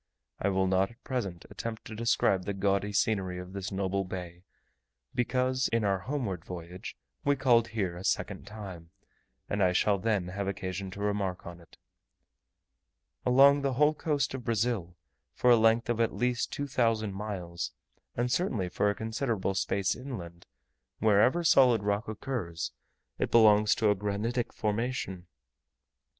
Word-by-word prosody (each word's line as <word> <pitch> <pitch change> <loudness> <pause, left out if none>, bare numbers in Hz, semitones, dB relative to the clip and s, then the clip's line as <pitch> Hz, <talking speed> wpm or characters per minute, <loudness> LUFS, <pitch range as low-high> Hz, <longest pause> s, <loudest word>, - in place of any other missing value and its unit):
I 100 - +1
will 95 -1 +2
not 95 +1 +2
at 115 +2 -20
present 100 - -3
attempt 115 -1 -6
to 110 - -7
describe 105 -4 +2
the 100 - -2
gaudy 100 +1 +1
scenery 95 -4 0
of 90 +1 -8
this 100 +1 -4
noble 95 0 -1
bay, 90 -2 -7 0.7
because, 130 +1 +1
in 115 -1 0
our 100 -2 +1
homeward 110 - -3
voyage, 90 +1 -8 0.3
we 145 - +3
called 120 -4 +4
here 100 -6 -2
a 90 - -8
second 100 - -1
time, 95 -6 -9 0.6
and 100 - -1
I 90 -1 +4
shall 100 +2 +2
then 100 -4 0
have 100 +1 -3
occasion 95 0 -4
to 100 +2 -8
remark 100 -3 -1
on 85 0 -8
it. 85 - -19 1.5
Along 140 +3 +6
the 135 -1 0
whole 150 +4 +4
coast 150 -3 -1
of 130 -2 -5
Brazil, 110 -6 -1 0.4
for 125 - +4
a - - +9
length 115 +1 +3
of 120 -1 0
at 115 - +1
least 125 0 0
2000 115 -7 0
miles, 95 -4 -4 0.4
and 120 +1 0
certainly 115 - 0
for 105 - +1
a 100 - -1
considerable 110 -3 -1
space 95 +1 0
inland, 85 -11 -8 0.5
wherever 110 +10 +4
solid 125 -8 +5
rock 105 +1 0
occurs, 105 - -4 0.5
it - - 0
belongs 105 -2 +6
to 110 -2 +3
a - - +2
granitic 105 +5 -2
formation. 105 -4 -2
105 Hz, 155 wpm, -29 LUFS, 95-120 Hz, 1.5 s, a